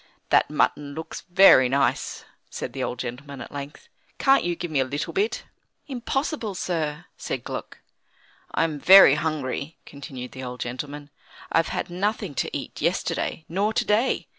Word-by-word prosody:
"That -, -, +4 dB
mutton 145 Hz, -1 st, 0 dB
looks 160 Hz, 0 st, -6 dB
very 175 Hz, -9 st, +7 dB
nice," 135 Hz, -2 st, 0 dB, 0.2 s
said 120 Hz, -, -6 dB
the 135 Hz, -, -4 dB
old 125 Hz, -, -3 dB
gentleman, 130 Hz, +3 st, -6 dB
at -, -, -8 dB
length. 145 Hz, +1 st, -8 dB, 0.3 s
"Can't 270 Hz, 0 st, +4 dB
you 175 Hz, 0 st, -1 dB
give 175 Hz, -1 st, -5 dB
me 145 Hz, -, +1 dB
a -, -, +4 dB
little 145 Hz, +3 st, -4 dB
bit?" 410 Hz, +3 st, 0 dB, 0.4 s
"Impossible, 265 Hz, -, -3 dB
sir," 160 Hz, -5 st, -2 dB
said -, -, -4 dB
Gluck. -, -, -6 dB, 0.7 s
"I'm 160 Hz, -3 st, 0 dB
very 190 Hz, -3 st, +9 dB
hungry," 150 Hz, -1 st, -2 dB
continued 130 Hz, -3 st, -8 dB
the 130 Hz, -, -8 dB
old 125 Hz, 0 st, -6 dB
gentleman; 145 Hz, +4 st, -6 dB, 0.4 s
"I've 165 Hz, -, +3 dB
had 175 Hz, -, -3 dB
nothing 195 Hz, -3 st, -2 dB
to -, -, -2 dB
eat -, -, -8 dB
yesterday, 160 Hz, -, -1 dB
nor 200 Hz, +6 st, 0 dB
to -, -, +1 dB
day. 220 Hz, +5 st, +1 dB
150 Hz, 160 wpm, -25 LUFS, 135-185 Hz, 0.7 s, very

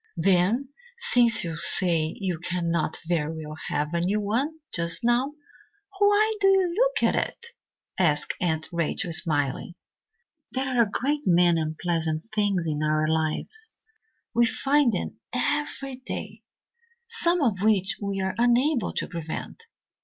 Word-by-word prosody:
"Then, 195 Hz, +8 st, +2 dB, 0.3 s
since 240 Hz, -, +4 dB
you 165 Hz, -2 st, -4 dB
say 165 Hz, -1 st, +3 dB
you 185 Hz, -4 st, -2 dB
cannot 170 Hz, -2 st, -1 dB
very 160 Hz, -2 st, -2 dB
well 155 Hz, 0 st, -8 dB
have 150 Hz, +2 st, -2 dB
a 170 Hz, -, 0 dB
new 195 Hz, +5 st, 0 dB
one 245 Hz, +10 st, -1 dB, 0.2 s
just 170 Hz, +1 st, -1 dB
now, 245 Hz, +4 st, +1 dB, 0.7 s
why 415 Hz, +2 st, +3 dB
do 390 Hz, -, +5 dB
you 380 Hz, -3 st, +3 dB
look -, -, +1 dB
at -, -, 0 dB
it?" 470 Hz, 0 st, -3 dB, 0.5 s
asked 150 Hz, -5 st, +2 dB
Aunt 160 Hz, -3 st, -1 dB
Rachel, 170 Hz, 0 st, -2 dB
smiling. 155 Hz, 0 st, -1 dB, 0.8 s
"There 265 Hz, 0 st, -1 dB
are 250 Hz, -2 st, +2 dB
a 220 Hz, -, +2 dB
great 290 Hz, +7 st, -2 dB
many 175 Hz, -2 st, +4 dB
unpleasant 160 Hz, 0 st, -2 dB
things 200 Hz, -5 st, 0 dB
in 150 Hz, -2 st, -2 dB
our 155 Hz, 0 st, +1 dB
lives 160 Hz, -, -1 dB, 0.6 s
we 235 Hz, 0 st, +4 dB
find 275 Hz, +1 st, +2 dB
them -, -, -4 dB
every 275 Hz, -3 st, -2 dB
day 260 Hz, -, -7 dB, 0.6 s
some 360 Hz, -8 st, +4 dB
of 205 Hz, -7 st, 0 dB
which 205 Hz, -2 st, +1 dB
we 200 Hz, -1 st, -2 dB
are 190 Hz, 0 st, -1 dB
unable 245 Hz, +2 st, +2 dB
to -, -, -3 dB
prevent. 170 Hz, -, -7 dB
195 Hz, 140 wpm, -25 LUFS, 165-270 Hz, 0.8 s, do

